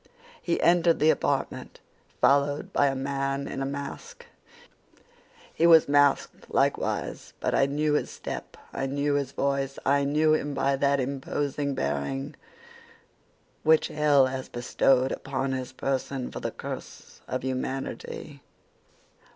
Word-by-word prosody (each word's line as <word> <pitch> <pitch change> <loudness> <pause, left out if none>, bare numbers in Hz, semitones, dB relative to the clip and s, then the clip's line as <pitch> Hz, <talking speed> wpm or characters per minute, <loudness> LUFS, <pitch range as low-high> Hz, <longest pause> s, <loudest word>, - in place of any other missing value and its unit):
"He 170 - -1
entered 170 -1 +4
the 155 +1 +5
apartment - - -2 0.4
followed 140 +1 +2
by 145 - +4
a 135 - 0
man 135 +1 -2
in 135 - -4
a 135 - -1
mask. 305 - -7 1.3
He 165 - +3
was 165 -2 +7
masked 145 0 +2
likewise; - - -1
but - - -1
I 135 - +3
knew 150 +2 0
his 150 - 0
step, - - -7 0.2
I 135 - -2
knew 145 +1 0
his 140 -2 -1
voice, 140 0 -1
I 140 +1 +3
knew 155 +2 +3
him 145 -2 -1
by 140 0 +1
that 140 +1 +2
imposing 140 +1 -2
bearing 135 - -2 1.3
which 160 0 +4
hell 150 -3 +4
has 130 0 -4
bestowed 130 +2 +2
upon 135 0 -3
his 130 -1 -3
person 135 0 -3
for - - -6
the - - -3
curse - - -9
of 130 -1 -3
humanity. 135 +2 -4
140 Hz, 135 wpm, -27 LUFS, 135-145 Hz, 1.3 s, was